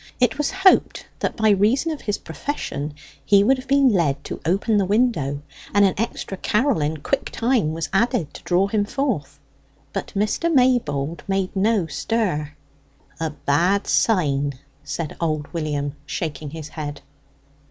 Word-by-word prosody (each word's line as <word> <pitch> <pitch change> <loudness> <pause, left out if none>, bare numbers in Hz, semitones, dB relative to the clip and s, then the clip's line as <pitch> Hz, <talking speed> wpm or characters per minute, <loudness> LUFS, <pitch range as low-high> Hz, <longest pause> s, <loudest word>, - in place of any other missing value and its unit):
It 250 +3 +2
was 295 - +1
hoped 385 0 +3
that - - -2
by 220 -2 +4
reason 220 - +2
of 305 - -5
his 205 -2 -1
profession 150 - -5 0.3
he 200 +4 +5
would 260 +5 +3
have 255 - -10
been 275 -1 +5
led 170 - +1
to - - -6
open 200 +5 +2
the 200 - +2
window, 185 - +1 0.3
and 205 0 +6
an 190 - +3
extra 200 -2 -3
carol 225 - +1
in 150 +2 -1
quick - - -1
time 230 -10 +1
was 165 0 -3
added 220 - +1
to - - -10
draw 180 +2 +2
him 205 +1 +1
forth. 215 - -2 0.5
But - - -4
Mr. 215 +12 +1
Maybold 200 - +2
made 195 -1 -1
no 200 -1 +2
stir. 160 -3 -1 0.7
"A 160 -1 -1
bad 165 +7 +1
sign!" 145 -9 +2 0.3
said 145 +2 -4
old 155 -2 -2
William, 150 -3 -2
shaking 155 -1 -4
his 155 0 -8
head. 145 -2 -6
190 Hz, 155 wpm, -22 LUFS, 150-230 Hz, 0.7 s, and